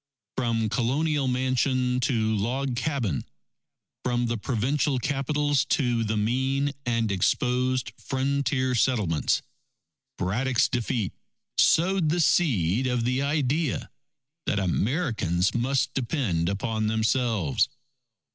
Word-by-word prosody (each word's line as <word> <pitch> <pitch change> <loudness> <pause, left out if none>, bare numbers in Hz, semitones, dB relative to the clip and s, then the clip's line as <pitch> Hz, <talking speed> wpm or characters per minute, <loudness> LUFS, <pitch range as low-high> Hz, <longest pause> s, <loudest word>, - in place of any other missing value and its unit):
From 115 -3 0
colonial 135 +5 0
mansion 130 0 +1
to 110 -4 +1
log 125 +5 -1
cabin, 120 - -1 0.8
from 120 -1 0
the 120 0 -1
provincial 135 +5 0
capitals 145 +2 0
to 120 -5 +1
the 110 0 -1
mean 130 +6 0 0.2
and 115 -3 +1
exposed 125 +5 +1
frontier 135 -1 0
settlements, 105 - +1 0.7
Braddock's 120 +7 +1
defeat 115 -4 -2 0.5
sowed 175 -1 +4
the 175 +3 +1
seed 130 - +2
of 125 -2 0
the 125 +3 0
idea 145 +2 0 0.6
that - - +1
Americans 100 - 0
must 130 +3 0
depend 115 - -1
upon 110 +2 -1
themselves. 110 - +1
125 Hz, 100 wpm, -26 LUFS, 110-135 Hz, 0.8 s, sowed